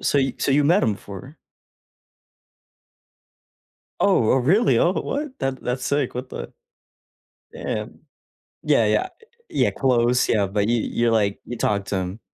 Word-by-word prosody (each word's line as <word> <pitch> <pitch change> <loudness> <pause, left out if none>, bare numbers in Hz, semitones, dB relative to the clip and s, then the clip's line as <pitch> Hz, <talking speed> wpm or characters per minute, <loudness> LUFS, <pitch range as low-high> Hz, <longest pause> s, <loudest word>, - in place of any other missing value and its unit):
so 145 - +1
y 135 0 +1
so - - 0
you 140 +1 +3
met 175 +7 +4
him 110 - +2
before? 100 - -11 2.6
Oh, 110 - +3
oh, - - +3
really, 140 - +3
oh, 175 - +3
what, 285 +5 -4
that 135 0 -3
that's 125 +1 -3
sick, 140 -3 -1
what 130 +1 -5
the - - -7 1.0
damn. - - -5 0.6
Yeah, - - +3
yeah. - - +1 0.4
Yeah, - - +1
close, 125 -2 +2
yeah, 105 -3 +2
but 100 +2 -1
you 120 -1 +2
you're, 120 0 0
like, 100 -2 +1
you 120 - -6
talk 100 -2 0
to 100 - -2
him. 95 +3 -4
125 Hz, 150 wpm, -22 LUFS, 105-140 Hz, 2.6 s, met